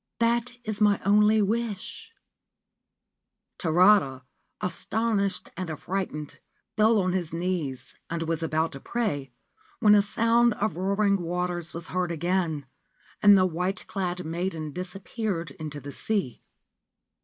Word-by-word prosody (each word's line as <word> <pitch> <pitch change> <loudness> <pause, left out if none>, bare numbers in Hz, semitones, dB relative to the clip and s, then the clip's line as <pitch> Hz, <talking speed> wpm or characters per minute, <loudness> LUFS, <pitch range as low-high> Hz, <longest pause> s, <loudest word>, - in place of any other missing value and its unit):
That 235 +1 +1
is 215 -1 -4
my 205 -1 +4
only 210 +1 +5
wish/ 225 - -3 1.5
Tarada, 170 -6 +4 0.4
astonished 200 +1 -1
and 180 0 -4
affrighted, 155 -2 -4 0.4
fell 220 0 +4
on 185 -1 +1
his 175 -4 -2
knees, 165 -7 -2 0.2
and 170 0 -2
was 165 -1 -2
about 160 0 0
to 135 - -8
pray, 145 - -2 0.5
when 210 -2 +6
a 205 - +7
sound 230 +2 +3
of 215 - -1
roaring 200 +1 +1
waters 175 -1 -2
was 170 0 -6
heard 180 -1 -1
again, 170 -3 -1 0.6
and 205 -1 +8
the 185 - +4
white 180 +3 -2
clad 180 -3 -3
maiden 165 -2 -3
disappeared 185 - -4
into 150 0 -7
the 145 +1 -8
sea. 195 - -2
185 Hz, 125 wpm, -27 LUFS, 165-210 Hz, 1.5 s, and